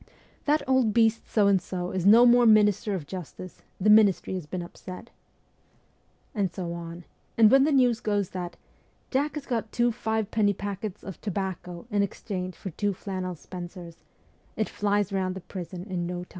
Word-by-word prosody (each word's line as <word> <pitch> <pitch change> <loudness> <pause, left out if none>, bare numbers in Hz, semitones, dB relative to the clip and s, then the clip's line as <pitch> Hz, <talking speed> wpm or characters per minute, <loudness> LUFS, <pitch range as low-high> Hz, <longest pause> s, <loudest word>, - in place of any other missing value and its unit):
' - - -33
That 295 -1 +2
old 260 -5 +2
beast 225 -1 +2
So 210 -3 +3
and 195 -2 +4
So 180 0 -4
is 185 0 0
no 230 +4 +8
more 240 0 +6
minister 210 -1 +4
of 165 -6 -5
justice: 185 +1 -8 0.2
the 210 +2 +4
ministry 210 -4 +4
has 180 -5 -5
been 180 +2 -4
upset.' 180 +1 -10 1.2
And 200 -6 0
so 170 -1 -5
on; 170 0 -8 0.3
and 220 -1 +7
when 270 0 +6
the 310 - +2
news 250 -4 +3
goes 205 -4 -1
that 180 -2 -6 0.3
' - - -39
Jack 285 +3 0
has 295 -2 -5
got 225 -3 -2
two 240 0 +2
five 220 -2 -2
penny 205 -2 +2
packets 200 +1 -5
of 190 - -9
tobacco 190 -3 -4
in 205 -1 +2
exchange 185 -2 -4
for 190 - -7
two 205 +5 -1
flannel 185 -1 -5
spencers,' 175 0 -9 0.5
it 215 - -1
flies 205 -1 0
round 185 -1 -1
the 190 - -7
prison 180 0 -7
in 175 -3 -3
no 180 0 -4
time. - - -16
200 Hz, 185 wpm, -27 LUFS, 180-220 Hz, 1.2 s, no